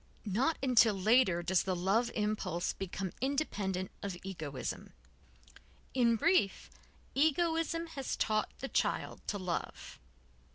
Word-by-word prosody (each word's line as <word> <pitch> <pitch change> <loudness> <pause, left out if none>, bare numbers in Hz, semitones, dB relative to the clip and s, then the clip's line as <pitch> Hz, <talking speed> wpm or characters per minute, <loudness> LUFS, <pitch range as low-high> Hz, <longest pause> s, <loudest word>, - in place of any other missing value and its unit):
Not 245 - +1
until 235 -5 +5
later 195 -3 +3
does 180 +1 +3
the 185 -1 -1
love 195 +7 +2
impulse 210 -5 -1
become 190 -1 -4
independent 205 -10 -1
of 195 -3 -4
egoism. 155 -9 -5 1.0
_In 235 -3 +4
brief, 330 - +2 0.4
egoism 330 +3 +1
has 290 -6 -4
taught 215 -1 +1
the 270 - -2
child - - -1
to 205 - -1
love. 185 -3 -4
215 Hz, 115 wpm, -33 LUFS, 185-270 Hz, 1.0 s, until